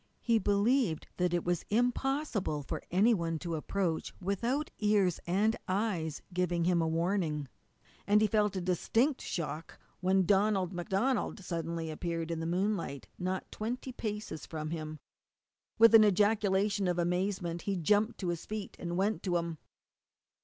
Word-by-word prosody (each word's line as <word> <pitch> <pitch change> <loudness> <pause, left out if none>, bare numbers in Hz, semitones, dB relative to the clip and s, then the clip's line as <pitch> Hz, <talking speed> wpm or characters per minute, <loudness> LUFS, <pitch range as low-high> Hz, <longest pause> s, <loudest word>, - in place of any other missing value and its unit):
He 230 -2 +3
believed 205 - +2
that 180 -1 +1
it 175 -1 0
was 175 -1 0
impossible 245 - 0
for - - -4
any 205 +7 +4
one 165 -5 -1
to 170 +1 -4
approach 165 +1 -2
without 235 - -1
ears 205 -5 +2
and 210 +6 +2
eyes 185 -6 -1
giving 175 -1 0
him 175 0 +3
warning, 165 -2 0 0.6
and 205 +1 +5
he 215 - +4
felt 210 -1 +2
a 185 - -1
distinct 225 - +1
shock 160 -1 -4 0.2
when 190 0 +3
Donald 195 -1 +2
MacDonald 195 +6 -1
suddenly 165 -2 -3
appeared 165 +1 -3
in 165 - -2
the 165 - -3
moonlight 175 - -1
not 185 +1 -3
twenty 245 +4 -4
paces 210 -9 -5
from 155 -1 -5
him. 155 -2 -4 0.8
With 230 0 +7
an 225 -1 +10
ejaculation 205 -1 +2
of 175 -1 0
amazement 175 0 -1
he 195 - +1
jumped 210 +6 +2
to 180 - -1
his 170 -1 -3
feet 215 -2 -5
and 175 0 -3
went 205 +3 +1
to 180 -3 +1
him. 170 -2 -4
185 Hz, 150 wpm, -31 LUFS, 170-210 Hz, 0.8 s, an